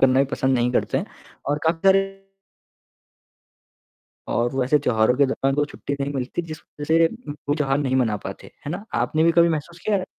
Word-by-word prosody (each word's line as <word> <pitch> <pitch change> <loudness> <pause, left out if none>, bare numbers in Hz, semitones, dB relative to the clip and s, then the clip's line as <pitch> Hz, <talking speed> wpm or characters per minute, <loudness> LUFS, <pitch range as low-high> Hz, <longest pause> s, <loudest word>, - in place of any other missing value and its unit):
करना 130 0 +5
भी - - +4
पसंद 130 0 +1
नहीं 120 +1 +2
करते 135 - +1
हैं 190 - -4 0.4
और 145 +1 +1
काफ़ी 165 +1 +2
सारे 195 0 +6 2.3
और 120 +2 0
वैसे 135 +3 +3
त्योहारों 120 -3 +2
के 140 -1 +4
दौरान 135 0 0
तो 145 0 +2
छुट्टी 145 -1 -5
नहीं 140 +1 -1
मिलती, 130 +6 -2
जिस 155 -1 -7 0.2
वजह - - -2
से 165 +2 +4 0.4
वो 145 - +3
त्योहार 140 -2 +1
नहीं 130 -2 0
मना 115 -5 +2
पाते। - - -9
है 145 - -4
ना? 190 +5 -5
आपने 155 +1 +1
भी 170 - +4
कभी 170 0 +5
महसूस 165 +2 -3
किया 210 -2 +2
है? 185 - -2
145 Hz, 200 wpm, -23 LUFS, 130-165 Hz, 2.3 s, सारे